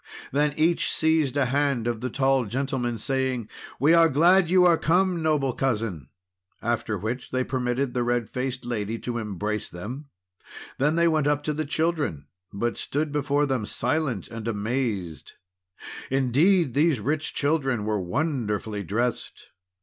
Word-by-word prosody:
Then 150 +1 +1
each 165 +2 +2
seized 155 -4 +1
a 140 - +3
hand 135 -2 0
of 120 -2 -2
the 130 - -2
tall 135 0 +2
gentleman, 125 0 -2
saying: 130 -1 -1 0.3
"We 145 +6 +5
are 165 -1 +6
glad 175 +5 +4
you 180 0 +5
are 175 -1 +6
come, 180 +2 +1
noble 150 -5 +1
Cousin!" 110 - -2 0.5
After 115 -2 -1
which 110 +6 -4
they 130 0 0
permitted 125 0 -1
the 125 - 0
red 120 -1 0
faced 130 0 -4
lady 115 -2 -2
to 120 0 -4
embrace 105 0 -3
them; 120 - -7 0.7
then 150 +4 +2
they 170 0 +4
went 155 -3 +2
up 145 0 +1
to 150 - -1
the 155 +1 -2
children, 155 - -1 0.3
but 120 +4 -2
stood 150 +1 -2
before 145 0 +1
them 130 -6 -1
silent 130 - -1
and 115 -1 -6
amazed. 105 -6 -3 0.8
Indeed, 135 +4 +3
these 150 -1 +3
rich 150 +7 -2
children 135 -7 0
were 105 -2 0
wonderfully 110 - -2
dressed! 115 +6 -3
130 Hz, 150 wpm, -25 LUFS, 115-150 Hz, 0.8 s, are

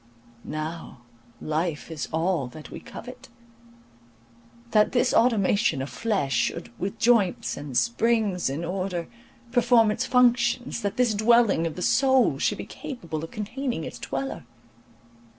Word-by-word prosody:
Now 155 -4 -6 0.4
life 155 +1 -2
is 160 - -5
all 165 -3 0
that 150 +5 -11
we - - -7
covet; - - -11 1.4
that 210 0 +3
this 250 0 +2
automaton 210 - +3
of 135 +1 -4
flesh 195 - -1
should, - - -1
with 195 +2 -3
joints 230 -6 +2
and 145 -3 -4
springs 220 - +1
in 150 +5 -3
order, 180 -1 -3 0.4
perform 235 -2 +4
its - - -2
functions, 245 -1 +2
that 200 0 -3
this 245 -3 +3
dwelling 215 -5 +3
of 160 - -6
the 180 - -4
soul 265 +2 +3
should - - +1
be - - -6
capable 170 - -6
of 165 - -6
containing 235 - -4
its - - -7
dweller. 135 0 -4
200 Hz, 135 wpm, -25 LUFS, 160-235 Hz, 1.4 s, perform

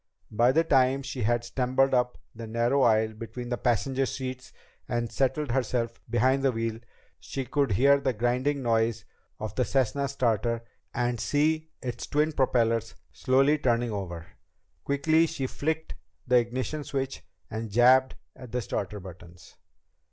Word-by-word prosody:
By 120 +4 +4
the 160 +5 +3
time 135 -2 +3
she 135 -2 -5
had 120 +2 +1
stumbled 130 +2 +1
up 125 -1 +1 0.2
the 115 0 -8
narrow 120 +5 +1
aisle 110 -2 +3
between 120 +2 -7
the 120 - -1
passenger 130 +3 +1
seats 130 -1 -6 0.4
and 120 -1 -1
settled 135 +1 0
herself 120 -2 -1
behind 130 +4 +2
the 135 -1 +3
wheel, 115 -1 -3 0.4
she 135 -1 -5
could 140 -5 0
hear 140 +7 +5
the 135 -1 0
grinding 125 +5 0
noise 115 -1 +1 0.3
of 110 -2 -5
the 125 - +1
Cessna's 135 +3 0
starter 115 -2 0 0.3
and 120 -1 -1
see 155 +7 +1
its 125 -2 -5
twin 150 +1 +1
propellers 115 -5 +1 0.2
slowly 135 +3 +2
turning 120 -3 +1
over. 85 -5 -5 0.6
Quickly 155 +4 +2
she 135 - -3
flicked 160 +4 -3 0.3
the 125 0 +4
ignition 130 +5 -3
switch 135 -1 -3 0.3
and 110 +1 -4
jabbed 130 +4 +5 0.2
at 125 -3 -11
the 125 0 -1
starter 100 +1 -4
buttons. 90 -1 -13
125 Hz, 150 wpm, -27 LUFS, 115-135 Hz, 0.6 s, hear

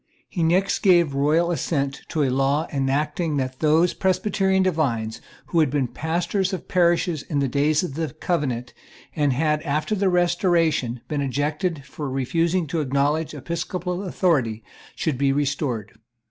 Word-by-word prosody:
He 175 - -4
next 180 +4 +2
gave 175 -6 +4
the 135 - -4
royal 160 +4 +2
assent 140 -5 -1
to 155 - 0
a 130 - +1
law 135 +4 +1
enacting 150 +3 0
that 130 -1 -3
those 160 +3 +3
Presbyterian 190 0 +1
divines 130 -11 -1 0.2
who 170 - 0
had 155 -4 +4
been 140 -2 0
pastors 175 - -1
of 185 - -5
parishes 175 -3 +2
in 145 - -4
the 140 -1 +2
days 145 +4 +2
of 175 - -4
the 160 +1 -2
Covenant, 140 -8 -2 0.4
and 145 -3 +2
had, 150 +3 +1
after 155 +6 -1
the 195 -2 +2
Restoration, 170 - +1
been 150 -2 -2
ejected 145 +3 -2
for 140 +1 -6
refusing 165 +7 0
to 160 +2 -2
acknowledge 145 +3 0
episcopal 175 +4 -3
authority, 140 - 0 0.3
should 150 -6 -2
be 140 -1 +3
restored. 135 -6 -1
155 Hz, 155 wpm, -23 LUFS, 140-175 Hz, 0.4 s, gave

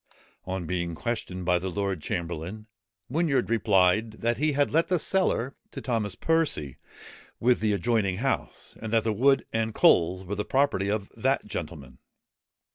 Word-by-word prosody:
On 95 -1 -3
being 85 -1 -2
questioned 95 -4 -4
by 90 0 +3
the 95 +2 -3
lord 95 -2 -2
chamberlain, 85 +2 -4 0.4
Whinyard 135 - 0
replied, 105 0 +3
that 115 +1 -1
he 150 0 +2
had 145 0 +1
let 165 +2 +2
the 180 - +2
cellar 155 -8 0
to - - -7
Thomas 110 -6 -2
Percy, 150 - 0 0.6
with 125 +1 +3
the 110 -1 +1
adjoining 100 -2 +1
house, 135 +4 -3
and 110 - -5
that 115 -1 +3
the 110 - 0
wood 135 +6 +3
and 110 -1 -1
coals 90 +2 +4
were 95 - -4
the 105 +1 -2
property 130 -8 +1
of 105 -1 -2
that - - 0
gentleman. 65 -2 -7
105 Hz, 160 wpm, -27 LUFS, 90-125 Hz, 0.6 s, coals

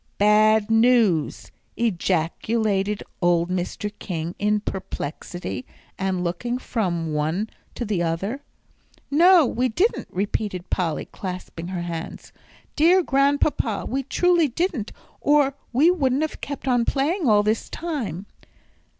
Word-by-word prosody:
"Bad 215 +1 +4
news!" 225 -9 +3 0.3
ejaculated 200 +1 0 0.2
old 175 0 +2
Mr. 185 +3 -3
King, 170 -2 -4
in 210 +1 +2
perplexity, 180 - -5 0.3
and 190 -2 -1
looking 185 +8 -2
from 175 -11 -2
one 160 +8 -1 0.2
to 240 - -3
the 200 -5 -1
other. 190 +11 -2 0.7
"No, 340 +2 +6
we 250 +1 0
didn't," 370 - 0
repeated 195 -1 -3
Polly, 170 -4 -1
clasping 180 -3 -7
her 180 -2 -4
hands. 170 -1 -6 0.4
"Dear 350 +5 +5
Grandpapa, 275 -6 +1
we 270 +3 -1
truly 345 +4 +2
didn't, 280 - -2 0.3
or 290 -2 +3 0.2
we 290 +8 +5
wouldn't 280 -4 +1
have 315 - -4
kept 280 -1 -6
on 245 -2 +3
playing 290 - 0
all 210 -1 +5
this 215 +2 -1
time." 235 - -4
215 Hz, 120 wpm, -23 LUFS, 180-275 Hz, 0.7 s, No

